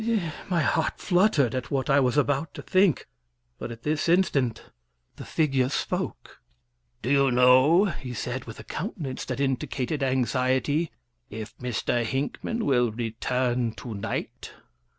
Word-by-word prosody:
My 170 -4 +2
heart 160 +2 0
fluttered 175 - +2
at 130 -1 -3
what 135 -2 -1
I 140 -1 +4
was 130 0 +1
about 145 +1 +1
to - - -7
think, 185 -5 +2 0.5
but - - -5
at 115 0 -10
this 150 +2 0
instant 140 -10 +2 0.5
the - - -8
figure 135 -5 +1
spoke. - - -4 0.6
"Do 125 - -1
you 140 -1 +4
know," 130 +9 +6
he 135 -9 -5
said, 125 +3 -4
with 115 - -9
a - - -8
countenance 160 - -5
that - - -4
indicated 135 +1 -1
anxiety, 130 +4 +1 0.4
"if 110 0 -7
Mr. 120 -1 -1
Hinckman 140 - -2
will 120 -4 +3
return 120 +1 -1
to 115 0 -7
night?" 100 +1 -5
130 Hz, 140 wpm, -26 LUFS, 125-150 Hz, 0.6 s, know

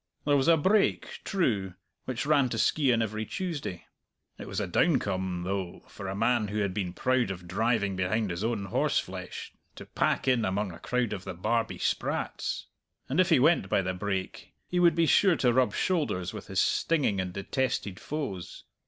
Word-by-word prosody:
There 145 -1 +4
was 135 +1 +2
a 165 -1 +6
brake, 195 +7 +1
true, 105 - 0 0.3
which 130 0 -3
ran 145 -3 +3
to - - -3
Skeighan 125 -7 +3
every 110 0 -3
Tuesday. 150 - -4 0.5
It - - -7
was 95 - -3
a 105 - -1
downcome, 95 - +1
though, 95 -1 -4
for 100 - -8
a 95 - -3
man 115 +1 +2
who 105 +1 -4
had 100 -3 0
been 95 -3 -2
proud 125 +4 +1
of 90 -2 -6
driving 100 0 +1
behind 95 +3 0
his 85 +4 -4
own 110 -3 -1
horseflesh 95 - -2 0.2
to - - -9
pack - - 0
in 125 -3 +3
among 100 -1 -1
a 85 - -11
crowd 125 -3 -1
of 95 - -5
the 90 - -6
Barbie 115 +6 -1
sprats. - - -2 0.4
And 140 +7 0
if 185 0 +4
he 165 - +6
went 155 +7 +3
by 100 - +2
the 95 +1 -2
brake, 95 0 -4
he 180 - 0
would 170 -2 +5
be 165 -1 +3
sure 185 +2 +5
to 125 -5 +2
rub 130 0 +2
shoulders 145 - 0
with - - -8
his - - -1
stinging 140 - +2
and 90 -1 -4
detested 100 0 -2
foes. 100 - -5
110 Hz, 190 wpm, -28 LUFS, 95-140 Hz, 0.5 s, a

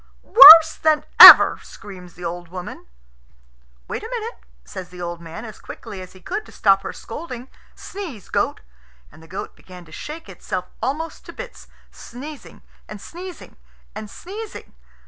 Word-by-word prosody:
"Worse 325 -7 +8
than 305 -1 0
ever!" - - +10
screams 180 -4 -14
the 180 - -11
old 175 +1 -7
woman. 180 +1 -11 1.0
"Wait - - -6
a 445 - -10
minute," 470 -1 -7 0.3
says 185 -2 -10
the 180 - -15
old 175 -1 -7
man 170 +6 -11
as 220 - -13
quickly 195 -2 -11
as 185 - -13
he 185 - -17
could, 415 - -6
to - - -16
stop 195 -1 +1
her - - -7
scolding. 250 -1 -10 0.3
"Sneeze, 335 - -10
goat." - - -3 0.5
And - - -19
the 160 - -18
goat 190 +4 -9
began 180 -1 -16
to 160 - -20
shake 310 - -10
itself 185 -3 -7 0.2
almost 295 +7 -5
to - - -11
bits, - - -12 0.2
sneezing 285 +5 -13 0.3
and 210 - -10
sneezing 355 - -12 0.4
and 215 -1 -10
sneezing. 415 - -11
215 Hz, 160 wpm, -19 LUFS, -, 1.0 s, ever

